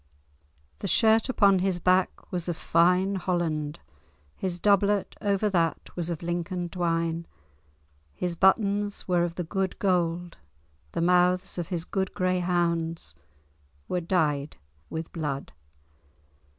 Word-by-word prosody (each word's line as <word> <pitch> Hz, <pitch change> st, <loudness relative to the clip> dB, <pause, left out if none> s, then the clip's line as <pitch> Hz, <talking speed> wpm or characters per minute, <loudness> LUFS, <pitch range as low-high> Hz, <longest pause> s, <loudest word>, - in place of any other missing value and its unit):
The -, -, -3 dB
shirt 225 Hz, +2 st, +4 dB
upon 200 Hz, -6 st, +4 dB
his 185 Hz, -1 st, 0 dB
back 185 Hz, +1 st, +1 dB
was 180 Hz, -1 st, -3 dB
of 170 Hz, -, -2 dB
fine 180 Hz, +4 st, +3 dB
Holland, 165 Hz, -4 st, -2 dB, 0.6 s
his 180 Hz, -2 st, -3 dB
doubtlet, 200 Hz, +1 st, +2 dB
over 200 Hz, 0 st, +1 dB
that, 165 Hz, -3 st, -1 dB
was 175 Hz, -1 st, -3 dB
of 170 Hz, -1 st, -4 dB
Lincoln 175 Hz, +1 st, -2 dB
twine, 165 Hz, -1 st, -1 dB, 0.8 s
his 175 Hz, -, -3 dB
buttons 200 Hz, +2 st, +2 dB
were 175 Hz, -2 st, +2 dB
of 170 Hz, -1 st, -3 dB
the 180 Hz, -, -2 dB
good 190 Hz, +2 st, -2 dB
gold, 175 Hz, -, 0 dB, 0.6 s
the -, -, -1 dB
mouths 180 Hz, +1 st, +2 dB
of 170 Hz, -, -3 dB
his 170 Hz, -2 st, -3 dB
good 190 Hz, 0 st, -2 dB
grey 185 Hz, -1 st, +1 dB
hounds 170 Hz, -, -1 dB, 0.7 s
were 180 Hz, -, -1 dB
dyed 150 Hz, -5 st, 0 dB, 0.3 s
with 160 Hz, 0 st, -5 dB
blood." 145 Hz, -4 st, -3 dB
175 Hz, 125 wpm, -27 LUFS, 165-190 Hz, 0.8 s, shirt